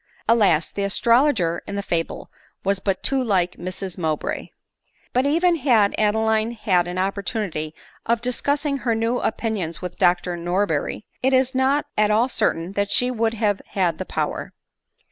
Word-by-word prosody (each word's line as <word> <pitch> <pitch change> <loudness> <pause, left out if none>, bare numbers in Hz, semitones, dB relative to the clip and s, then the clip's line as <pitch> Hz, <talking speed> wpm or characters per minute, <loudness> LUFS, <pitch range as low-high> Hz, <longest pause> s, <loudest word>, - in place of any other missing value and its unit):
Alas! 190 -9 +3
the 200 - -3
astrologer 205 - +2
in 200 - -4
the 200 - -2
fable 165 -3 -3 0.3
was 195 0 +1
but 190 -1 -2
too 270 -1 +2
like 185 -6 +1
Mrs 185 +1 -5
Mowbray! 155 -3 -2 0.6
But 255 +3 +2
even 335 +3 +3
had 235 -8 +3
Adeline 220 +1 +1
had 190 -6 +1
an 180 +1 -5
opportunity 195 -5 -2 0.3
of 235 0 +2
discus 250 +4 0
sing 280 -2 -1
her 235 -3 0
new 230 +2 0
opinions 205 -8 -2
with 180 -1 -7
Dr 175 0 +2
Norberry, 175 0 -1 0.2
it 265 +1 +2
is 260 0 +3
not 265 +3 +2
at 210 0 +4
all 225 +4 +3
certain 170 -7 0
that 200 0 -1
she 250 +3 +2
would 230 -1 0
have 210 -3 0
had 180 -4 +1
the - - -3
power. - - -3
210 Hz, 165 wpm, -22 LUFS, 180-240 Hz, 0.6 s, at